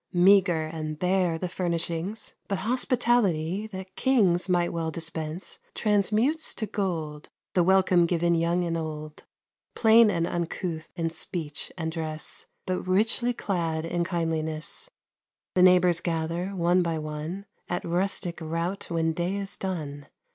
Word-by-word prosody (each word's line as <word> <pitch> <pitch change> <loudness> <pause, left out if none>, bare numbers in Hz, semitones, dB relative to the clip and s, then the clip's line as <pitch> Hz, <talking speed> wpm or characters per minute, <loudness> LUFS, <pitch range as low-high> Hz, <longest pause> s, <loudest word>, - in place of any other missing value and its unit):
Meager 180 -3 +5
and 155 -1 -5
bare 180 -1 +1
the 180 - -3
furnishings, 175 +3 -3
But 195 - -1
hospitality 220 - +1
that 190 -2 -9
kings 195 -9 +3
Might 175 -1 +2
well 165 -1 -1
dispense, 160 +1 -4 0.2
transmutes 215 +9 +1
to 220 - -2
gold, 165 -8 -3 0.2
The 180 - +4
welcome 185 -1 +4
given 170 0 +2
young 170 +1 +1
and 170 -1 -1
old. 155 -2 -6 0.5
Plain 225 0 +6
and 170 -4 +1
uncouth 170 -1 -3
in 165 -1 -1
speech 160 -2 -3
and 160 -2 -2
dress, 160 -1 -3 0.2
But 185 0 -1
richly 220 +6 +3
clad 165 -8 -2
in 170 +1 -1
kindliness, 165 - -2 0.6
The 185 - +3
neighbors 180 -2 +5
gather, 165 +1 -2
one 175 0 +3
by 165 -2 -1
one, 155 +5 -5 0.2
At 175 - -2
rustic 175 0 -1
rout 165 +4 -3
when 165 -1 0
day 175 +4 -1
is 200 0 -5
done. 150 -7 -5
175 Hz, 135 wpm, -27 LUFS, 160-190 Hz, 0.6 s, Plain